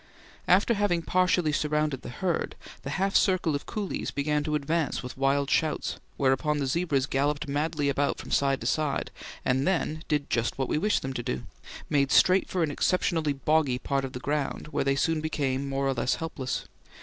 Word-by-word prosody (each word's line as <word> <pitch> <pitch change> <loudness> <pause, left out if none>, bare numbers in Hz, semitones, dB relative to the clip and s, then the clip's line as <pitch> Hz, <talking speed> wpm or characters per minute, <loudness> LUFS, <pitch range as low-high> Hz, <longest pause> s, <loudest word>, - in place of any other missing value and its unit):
After 195 +6 +4
having 200 -5 +1
partially 180 -3 +2
surrounded 150 -2 0
the - - -8
herd, 170 +7 -2 0.3
the 135 - -6
half 195 +1 0
circle 185 -5 +3
of 145 - -4
coolies 205 -3 -3
began 150 +1 0
to 155 -1 0
advance 150 0 -1
with 125 - -7
wild 135 +1 +1
shouts, 160 - 0 0.2
whereupon 140 +3 +2
the 140 - -1
zebras 140 -2 +1
galloped 145 +2 0
madly 145 +1 -1
about 140 0 +1
from - - -9
side 135 -1 +2
to - - -6
side, 150 -3 0 0.3
and 130 +2 +2
then 160 -4 0
did 150 -2 0
just 120 0 0
what 135 -1 -1
we - - +1
wished 210 +5 +1
them 135 0 -3
to 120 - -3
do 65 - -3 0.4
made 140 -2 +2
straight 185 +1 +5
for 180 -2 0
an 155 - 0
exceptionally 160 -1 +1
boggy 140 -2 +1
part 135 +1 -1
of 135 - -5
the 125 - -5
ground, 145 +2 -2
where - - 0
they 135 0 +2
soon 160 +3 +1
became 140 -3 -1
more 135 0 0
or 135 - +2
less 125 0 0
helpless. 145 -6 -4
145 Hz, 195 wpm, -27 LUFS, 135-160 Hz, 0.4 s, straight